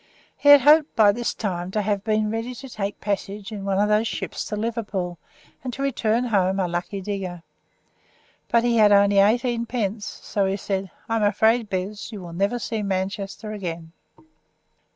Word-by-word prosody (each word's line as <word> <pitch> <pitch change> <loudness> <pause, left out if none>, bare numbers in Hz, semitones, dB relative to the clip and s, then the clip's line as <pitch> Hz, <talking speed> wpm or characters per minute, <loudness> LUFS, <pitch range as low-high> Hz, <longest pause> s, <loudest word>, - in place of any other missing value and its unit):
He 285 - +2
had 285 -1 +10
hoped 300 +3 +5
by 210 -2 +6
this 240 +3 -3
time 180 -4 -3
to 210 +2 -1
have 200 -1 -1
been 215 -1 +1
ready 225 +3 -3
to 270 - -9
take 205 -5 -4
a - - -45
passage 200 0 -3
in 205 -2 -6
one 195 -1 0
of 205 +1 +3
those 210 +2 +2
ships - - -4
to 210 - -4
Liverpool, 205 -6 -3 0.4
and 255 - -3
to 275 - -4
return 235 -3 +1
home 195 -5 +1
a 185 - +1
lucky 175 +3 -3
digger. 185 -3 -5 1.1
But 235 -1 +3
he 240 -1 +2
had 210 -2 +6
only 200 0 +5
eighteen 235 +3 +2
pence, 215 -3 -2
so 200 -2 -2
he 195 +1 -1
said, 195 -1 -3 0.2
"I 225 - 0
am 215 - 0
afraid, 220 +2 +3
Bez, 195 +4 -4
you 210 - -7
will 170 -2 -9
never 200 +7 0
see 225 -2 -3
Manchester 195 +2 -3
again." 170 -5 -6
210 Hz, 190 wpm, -23 LUFS, 195-230 Hz, 1.1 s, had